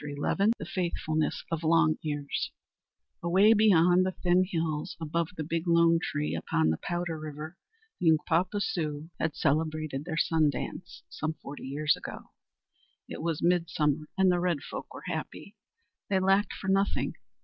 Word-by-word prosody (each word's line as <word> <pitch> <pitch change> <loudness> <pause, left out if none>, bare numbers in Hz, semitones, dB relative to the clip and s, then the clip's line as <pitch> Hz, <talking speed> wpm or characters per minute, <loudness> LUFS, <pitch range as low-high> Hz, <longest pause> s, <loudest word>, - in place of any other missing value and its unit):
IV 145 -1 -6 0.4
THE - - -6
FAITHFULNESS 160 -4 -1
OF 165 -1 -1
LONG 160 -1 +3
EARS 145 -2 -2 0.7
Away 190 +6 +5
beyond 180 -4 +5
the 185 0 -1
Thin 180 +1 +4
Hills, 160 -4 -2
above 165 +1 -1
the 155 - -2
Big 165 +3 -2
Lone 170 0 +5
Tree 150 0 -2
upon 80 0 +1
the 80 - -2
Powder 175 -2 -3
river, 155 +2 -7 0.4
the 170 - +3
Uncpapa 170 +5 +2
Sioux 155 -3 -3
had 160 -1 -1
celebrated 155 -1 -1
their 160 -3 -4
Sun 160 -2 +3
Dance, 140 - -6
some 155 0 -4
forty 140 -2 -9
years 150 +2 +1
ago. - - -9 0.8
It - - -7
was 165 -2 -2
midsummer 160 -4 +1
and 190 -1 +5
the 175 - +2
red 175 -5 0
folk - - -7
were - - -10
happy. 180 +4 -5 0.5
They 195 -2 +3
lacked 195 +1 +2
for 195 - -7
nothing. 195 +1 +1
165 Hz, 155 wpm, -29 LUFS, 155-180 Hz, 0.8 s, Away